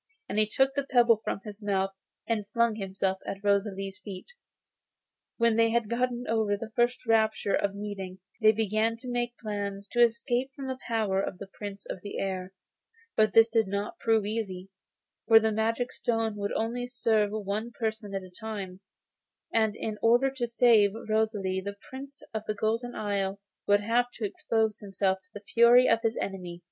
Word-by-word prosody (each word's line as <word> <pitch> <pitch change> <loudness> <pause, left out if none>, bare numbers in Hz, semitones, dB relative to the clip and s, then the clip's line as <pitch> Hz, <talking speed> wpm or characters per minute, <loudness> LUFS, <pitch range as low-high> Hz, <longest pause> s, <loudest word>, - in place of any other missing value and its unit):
He 215 0 +3
took 265 +5 +2
the 280 - 0
pebble 240 -5 +4
from - - -3
his 210 0 -9
mouth, 195 -1 0 0.4
and 215 -3 -1
flung 235 -1 +3
himself 190 -1 -1
at 195 +1 -6
Rosalie's 195 -1 0
feet. 200 - -9 1.0
When 230 -1 +3
they 230 0 +5
had 230 -1 0
got 250 +2 +2 0.2
over 220 -2 +1
the 220 +2 -7
first 245 +1 +1
rapture 220 -3 +2
of 200 0 +1
meeting 200 -2 -6 0.2
they 215 0 +7
began 220 +1 0
to 250 +1 -7
make 240 0 -2
plans 200 -2 -4
to 240 - +1
escape 240 +3 +2
from 275 - -6
the 260 -1 -4
power 215 -5 +1
of 190 - -4
the 200 - -7
Prince 200 0 -8
of 180 - -6
the 205 - -6
Air. 190 -1 -3 0.6
But 215 -2 +3
this 225 0 +7
did 225 -2 +2
not 200 +2 -3
prove 225 -2 +2
easy, 195 -3 -4 0.6
for 225 -1 +9
the 220 0 +1
magic 225 +3 0
stone 225 -2 -1
would 200 0 -2
only 240 +2 -2
serve 225 -4 +1
for 215 0 -4
one 210 +4 -2
person 220 -3 -4
at 195 - -3
a 185 - -12
time, 195 -2 -6 0.7
and 220 -2 +2
in 215 -1 -4
order 245 +4 +4
to 255 -3 -2
save 230 -4 +5 0.2
Rosalie 210 -4 0
the 200 +1 -6
Prince 275 +2 -9
of 220 - -2
the 215 - -1
Golden 230 +4 -1
Isle 200 -1 -1 0.3
would 205 0 +4
have 240 +3 +2
to 225 - -4
expose 220 +1 0
himself 195 -1 0
to - - -24
the 205 - -9
fury 240 +2 +7
of 230 0 +3
his 225 0 0
enemy. 180 -3 -4
220 Hz, 180 wpm, -28 LUFS, 200-230 Hz, 1.0 s, for